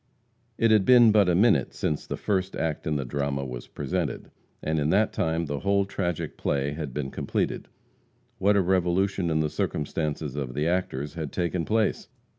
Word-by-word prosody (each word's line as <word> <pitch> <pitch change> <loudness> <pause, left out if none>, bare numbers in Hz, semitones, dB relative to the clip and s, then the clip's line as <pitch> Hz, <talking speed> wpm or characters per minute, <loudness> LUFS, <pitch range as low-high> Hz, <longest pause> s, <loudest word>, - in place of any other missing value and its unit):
It 115 -1 +3
had 105 -3 +5
been 120 0 +7
but 105 -3 +4
a 85 - +3
minute 95 - +3
since 75 - -2
the - - -4
first 95 -2 -1
act 80 -1 -2
in 75 - 0
the 70 -2 -2
drama 70 +1 -2
was 60 -2 -7
presented, - - -3 0.3
and 80 0 0
in 75 +1 +1
that 105 +5 +2
time 80 +1 0
the 70 -2 -3
whole 100 0 +2
tragic 90 -4 -3
play 70 0 -1
had 75 -2 -5
been 70 0 -4
completed. - - -2 0.7
What 100 +2 +3
a - - +4
revolution 95 0 +1
in 80 -1 +1
the 75 - +1
circumstances 75 -1 -2
of 65 -3 -4
the 75 +3 0
actors 75 -5 -1
had 80 -4 -5
taken 85 -1 -1
place? 110 -1 0
80 Hz, 185 wpm, -26 LUFS, 75-95 Hz, 0.7 s, been